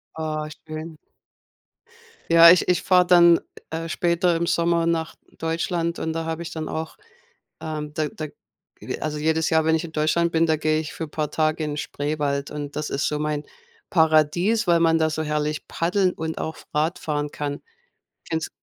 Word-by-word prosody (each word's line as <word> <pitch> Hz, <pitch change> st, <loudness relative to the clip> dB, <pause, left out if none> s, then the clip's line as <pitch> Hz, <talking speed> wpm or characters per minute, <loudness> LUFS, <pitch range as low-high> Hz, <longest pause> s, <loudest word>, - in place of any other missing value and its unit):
Oh, 155 Hz, -1 st, -3 dB, 0.2 s
schön. 155 Hz, +1 st, -7 dB, 1.3 s
Ja, 170 Hz, 0 st, +10 dB
ich 180 Hz, -, +3 dB
ich 180 Hz, -2 st, +2 dB
fahre 180 Hz, -1 st, +4 dB
dann, 170 Hz, -1 st, +7 dB, 0.3 s
äh, 165 Hz, +1 st, -4 dB
später 170 Hz, +1 st, +1 dB
im 170 Hz, +1 st, 0 dB
Sommer 170 Hz, 0 st, +1 dB
nach 165 Hz, -1 st, -1 dB, 0.2 s
Deutschland 165 Hz, +1 st, -1 dB
und 160 Hz, -, -3 dB
da 165 Hz, 0 st, -3 dB
habe 165 Hz, +1 st, -3 dB
ich 170 Hz, -, -7 dB
dann 160 Hz, -1 st, -5 dB
auch 160 Hz, 0 st, -4 dB, 0.7 s
ähm, 150 Hz, -1 st, -5 dB
da 155 Hz, -1 st, -1 dB
da 155 Hz, +1 st, -6 dB, 0.5 s
ge -, -, -6 dB
also, 150 Hz, -1 st, -3 dB
jedes 160 Hz, +1 st, +1 dB
Jahr, 160 Hz, -1 st, +3 dB
wenn 160 Hz, 0 st, +3 dB
ich 165 Hz, -, -3 dB
in 160 Hz, -, -8 dB
Deutschland 165 Hz, +2 st, +1 dB
bin, 165 Hz, 0 st, +3 dB
da 160 Hz, -1 st, +2 dB
gehe 155 Hz, 0 st, +1 dB
ich 155 Hz, -, -6 dB
für 160 Hz, -, -5 dB
paar 150 Hz, 0 st, -3 dB
Tage 155 Hz, 0 st, 0 dB
in 150 Hz, -1 st, -3 dB
Spreewald 145 Hz, -1 st, -2 dB
und 145 Hz, -1 st, -6 dB
das 150 Hz, 0 st, -3 dB
ist 140 Hz, -, -1 dB
so 150 Hz, 0 st, -1 dB
mein 150 Hz, -1 st, -2 dB, 0.4 s
Paradies, 165 Hz, +7 st, +3 dB
weil 170 Hz, -1 st, +4 dB
man 165 Hz, -1 st, +4 dB
da 160 Hz, 0 st, +2 dB
so 155 Hz, 0 st, -2 dB
herrlich 150 Hz, 0 st, -2 dB
Paddeln 180 Hz, +2 st, +1 dB
und 160 Hz, 0 st, -4 dB
auch 160 Hz, -, -4 dB, 0.2 s
Radfahren 150 Hz, -1 st, -1 dB
kann. 145 Hz, -1 st, -4 dB, 0.7 s
Kennst 160 Hz, 0 st, -2 dB
160 Hz, 180 wpm, -23 LUFS, 150-170 Hz, 1.3 s, Ja